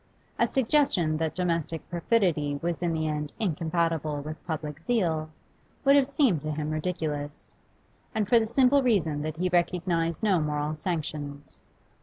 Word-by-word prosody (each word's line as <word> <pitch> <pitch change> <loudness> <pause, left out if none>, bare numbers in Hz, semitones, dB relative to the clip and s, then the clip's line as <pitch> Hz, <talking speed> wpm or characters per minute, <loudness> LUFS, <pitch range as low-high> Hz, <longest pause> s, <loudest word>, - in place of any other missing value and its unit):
A - - +4
suggestion 230 - +2
that 160 -1 -2
domestic 170 -3 -2
perfidy 170 -6 +1
was 170 +1 -2
in 175 -1 +1
the 160 -1 -1
end 150 -1 -3
incompatible 165 -4 0
with 155 +2 -8
public 150 -2 -4
zeal 165 -8 0 0.6
would 275 +1 +7
have 275 -2 +4
seemed 270 - +2
to 155 - -4
him 150 0 -3
ridiculous, 155 -3 -3 0.6
and 215 -2 +1
for 235 +3 +6
the 220 - -1
simple 265 +4 +4
reason 175 - +1
that 155 +1 -4
he 180 +2 +1
recognised 175 -1 0
no 195 -5 +3
'moral 150 0 -1
sanctions. 150 -3 -5
165 Hz, 150 wpm, -27 LUFS, 155-190 Hz, 0.6 s, would